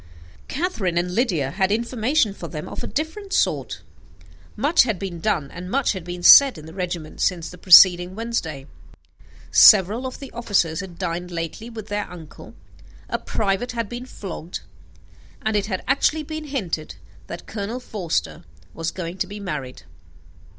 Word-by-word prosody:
Catherine 225 - -2
and 180 +1 -1
Lydia 180 - 0
had 190 +3 0
information 230 +1 +1
for - - -8
them 155 -3 -7
of - - -7
a - - -3
different 355 +7 -4
sort. - - 0 0.7
Much 290 +10 +4
had 225 -6 +1
been 180 -2 -6
done, 165 -7 -1
and 180 +1 -8
much 275 +4 +1
had 190 -3 -6
been 175 0 -7
said 275 +2 +9
in 155 - -10
the 160 - -11
regiment 175 -4 -5
since 170 -3 0
the 180 - -12
preceding 180 0 +7
Wednesday; 190 -12 -3 0.9
several 215 +5 +6
of 255 - -8
the 275 - -10
officers 190 -8 0
had 185 -4 -8
dined 180 -1 -3
lately 170 +6 -5
with 220 -3 -8
their 205 0 -3
uncle; 165 -3 -12 0.5
a - - -2
private 210 +4 -2
had 230 -2 -2
been 240 +3 -7
flogged; 180 -6 -7 0.8
and 220 0 0
it 205 -1 0
had 190 -3 -3
actually 295 +4 +2
been 310 +1 -6
hinted 195 - -4 0.3
that - - -8
Colonel 220 +4 -5
Forster 175 -7 -3 0.3
was 165 0 -3
going 180 0 -6
to - - 0
be 205 +2 -8
married. 145 -10 -6
195 Hz, 165 wpm, -22 LUFS, 175-235 Hz, 0.9 s, said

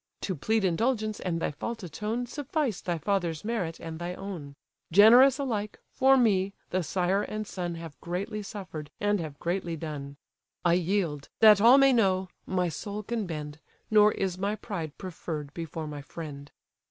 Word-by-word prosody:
To 190 - -2
plead 215 +6 0
indulgence, 215 +4 0
and 170 -3 -2
thy - - -1
fault 220 +9 -5
atone, 210 +8 -3
Suffice 280 - -2
thy 175 -2 -2
father's 170 -1 -1
merit 195 -8 -2
and 160 -1 -7
thy 175 +1 -4
own: 175 -8 -7 0.4
Generous 240 +8 +8
alike, 215 -7 -3
for 270 0 +5
me, 200 -5 +2 0.2
the 185 - +1
sire 180 +4 +1
and 215 +1 -4
son 175 -4 -4
Have 165 -5 -9
greatly 195 +5 -3
suffer'd, 185 -8 -7
and 205 0 +1
have 155 -4 -6
greatly 175 0 -2
done. 145 -3 -6 0.5
I 170 - +5
yield; 175 -5 0
that 210 -2 +8
all 240 +5 +8
may 275 -1 +6
know, 190 -5 +2 0.2
my 180 -1 +1
soul 205 +5 -5
can 225 -2 -2
bend, 150 -2 -6 0.3
Nor 210 0 +6
is 185 -2 -2
my 200 +2 0
pride 175 -8 -6
preferr'd 160 -5 -6
before 165 -1 -5
my 150 -1 -6
friend." 145 -1 -8
185 Hz, 165 wpm, -28 LUFS, 165-215 Hz, 0.5 s, Generous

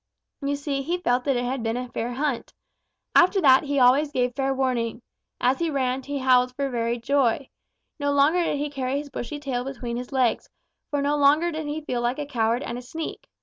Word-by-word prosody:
You 285 0 0
see, 280 -1 -2
he 340 +6 -1
felt 250 -7 0
that 275 -2 +2
it 245 - -1
had 260 +1 -2
been 225 +1 -1
a 250 0 -4
fair 240 +1 -3
hunt. 270 -1 -2 0.6
After 365 +3 +5
that 265 -2 +6
he 285 0 -1
always 270 +4 +4
gave 250 -2 0
fair 270 +1 0
warning. 250 -3 -1 0.4
As 255 +2 +2
he 335 -1 0
ran, 260 -2 0
he 285 +2 -4
howled 255 -1 +3
for 275 0 -1
very 235 0 -1
joy. 265 +1 +1 0.5
No 285 0 0
longer 290 +5 +3
did 295 - 0
he 290 +1 -3
carry 270 -1 -2
his 285 -1 -6
bushy 275 +2 -5
tail 265 -4 -3
between 250 -3 -5
his 250 +2 -6
legs, 255 -4 +1 0.4
for 290 -1 -1
no 290 +1 +1
longer 295 +4 +4
did 315 -1 -4
he 300 +1 -4
feel 245 -4 -2
like 240 +2 0
a 295 - -3
coward 235 -2 0
and 235 +1 -4
a - - -8
sneak. 310 +6 -7
270 Hz, 220 wpm, -25 LUFS, 245-285 Hz, 0.6 s, that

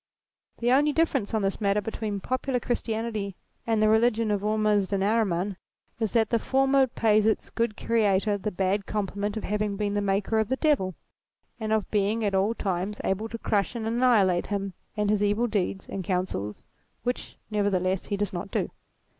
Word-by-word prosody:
The 240 +1 +1
only 290 +3 +4
difference, 280 -10 +1
on 220 -2 0
this 195 +3 -1
matter 200 0 +2
between 210 -1 -4
popular 255 +2 -1
Christianity 225 -4 -2 0.3
and 225 -1 +2
the - - +5
religion 220 0 +3
of 205 -1 0
Ormuzd 210 -2 +1
and 195 -1 +1
Ahriman, 200 -3 +1 0.4
is 220 -4 0
that 225 -2 +2
the 230 - +3
former 270 +3 +2
184 - - -23
THEISM - - -13
pays 215 -1 +5
its 220 - 0
good 230 -2 -1
Creator 205 -2 +2
the 210 - -2
bad 195 +1 -1
compliment 205 0 -2
of 220 - -4
having 210 0 -1
been 205 -1 -1
the 205 - +1
maker 200 +2 +1
of 220 - 0
the 260 - +2
Devil 265 - +1 0.6
and 220 -1 -3
of 220 -2 0
being 210 +2 +1
at 200 - 0
all 195 +4 +2
times 195 +1 -2
able 210 +4 -1
to 230 - -5
crush 210 0 0
and 225 -2 -3
annihilate 225 -6 +3
him 200 -2 -2 0.2
and 210 -1 +2
his 210 -1 +2
evil 205 +3 +2
deeds 200 -3 -1
and 195 - -4
counsels, 180 - -2 0.4
which 245 +1 -3
nevertheless 190 -3 +1
he 200 - -1
does 205 -1 -2
not 180 +2 -4
do. - - -1
210 Hz, 190 wpm, -27 LUFS, 195-225 Hz, 0.6 s, the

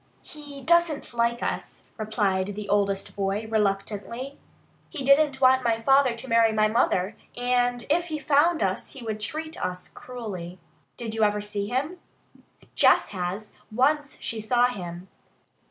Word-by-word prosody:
"He 290 -3 -11
doesn't 340 -6 +2
like 235 0 0
us," - - -4
replied 205 -3 -1
the 210 0 -6
oldest 200 -1 0
boy 200 +2 -1
reluctantly. 220 +5 -2 0.5
"He 300 -5 -5
didn't 275 0 +4
want 260 0 +5
my 230 -1 +2
father 270 +1 +4
to 235 +3 -7
marry 230 -2 +4
my 215 0 +3
mother, 210 -3 +1 0.2
and 245 0 +1
if 340 +4 +2
he 315 -3 -4
found 300 +1 +3
us 190 0 -2
he 270 - -10
would 215 -2 -4
treat 315 +9 -4
us 180 0 -4
cruelly." 195 -8 -7 0.4
"Did 225 -2 -5
you 225 - -2
ever 210 0 +2
see 205 -1 -3
him?" 285 - -2 0.7
"Jess - - +4
has. 190 +2 -4 0.2
Once 285 +5 +1
she 225 -1 -3
saw 240 +3 +3
him." 180 -5 -7
230 Hz, 150 wpm, -26 LUFS, 205-270 Hz, 0.7 s, want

